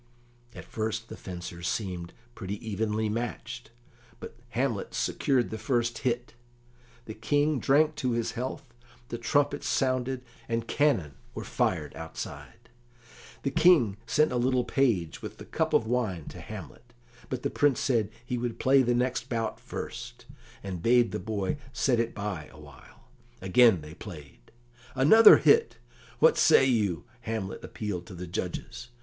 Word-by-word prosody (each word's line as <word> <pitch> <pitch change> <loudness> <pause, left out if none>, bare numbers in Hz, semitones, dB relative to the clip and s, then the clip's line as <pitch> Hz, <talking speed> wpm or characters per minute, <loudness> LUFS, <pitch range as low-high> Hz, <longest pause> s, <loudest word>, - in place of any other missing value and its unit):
At - - -9
first 110 +1 -3
the - - -7
fencers 85 -1 -7
seemed 90 -5 -3 0.2
pretty 100 -4 -5
evenly 110 +1 -1
matched, 120 +2 -4 0.5
but - - -9
Hamlet 120 -3 -2
secured 130 -3 +1
the 110 - -5
first 120 0 0
hit. 120 -2 -2 0.7
The 110 - -7
King 145 +6 +1
drank 150 +4 +3
to 130 -5 0
his 115 -1 -1
health, 125 0 -6 0.4
the 120 - -4
trumpets 145 +4 +1
sounded, 130 -1 0 0.3
and 115 0 -1
cannon 100 - +1 0.2
were - - -4
fired - - -1
outside. - - -8 0.7
The 135 - 0
King 135 - +4
sent 155 +6 +3
a 125 - 0
little 125 +1 +2
page 115 - 0
with - - -8
the - - -10
cup - - -1
of - - +3
wine 110 -9 -1
to - - -10
Hamlet, - - -10 0.4
but - - -4
the - - -1
Prince 145 -4 +2
said 115 -6 +1 0.2
he 125 0 -2
would 120 -1 -3
play 135 +1 +4
the 120 -1 +2
next 125 0 -1
bout 115 -3 -2
first, 120 +1 -7 0.4
and 95 -4 -5
bade 120 +2 +4
the 105 - -3
boy 105 +3 -2 0.2
set 125 -3 +2
it 115 0 -1
by 100 -7 -4
awhile. 75 -3 -16 0.3
Again 95 0 +5
they 75 +1 -10
played. 75 - -11 0.5
"Another 155 +13 +8
hit! 455 +1 +4 0.4
What 480 - +5
say 135 - +6
you?" 105 - +1 0.2
Hamlet 110 -5 -4
appealed 100 -5 -5
to 95 - -9
the 90 +1 -6
judges. 115 +7 -5
115 Hz, 150 wpm, -28 LUFS, 100-130 Hz, 0.7 s, Another